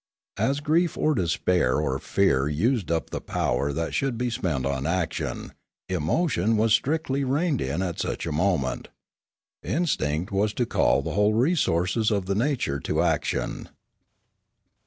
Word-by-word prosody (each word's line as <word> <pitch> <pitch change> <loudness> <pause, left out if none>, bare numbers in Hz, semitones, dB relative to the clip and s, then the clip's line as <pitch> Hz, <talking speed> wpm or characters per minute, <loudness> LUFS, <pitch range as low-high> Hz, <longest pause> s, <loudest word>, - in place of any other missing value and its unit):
As 140 +2 +1
grief 160 +3 +1
or 155 - +2
despair 85 - +1
or 70 -3 -1
fear 70 -9 +2
used 105 - 0
up 85 -1 -1
the - - -4
power 70 +1 -1
that 80 +4 -3
should 135 -4 0
be 125 0 -1
spent 85 - -1
on 70 0 -1
action, 85 -1 -2 0.4
emotion 95 - +1
was 110 0 +3
strictly 140 +2 +1
reined 145 +2 0
in 75 +8 -1
at 90 -3 -4
such - - -3
a 80 - -3
moment; 75 -4 0 0.7
the - - -8
instinct 95 - 0
was 105 +2 0
to 125 - +1
call - - +2
the - - -3
whole 105 +1 +2
resources 110 - +2
of 100 -3 0
the 100 - -1
nature 115 - 0
to - - 0
action. - - -1
100 Hz, 155 wpm, -25 LUFS, 80-130 Hz, 0.7 s, was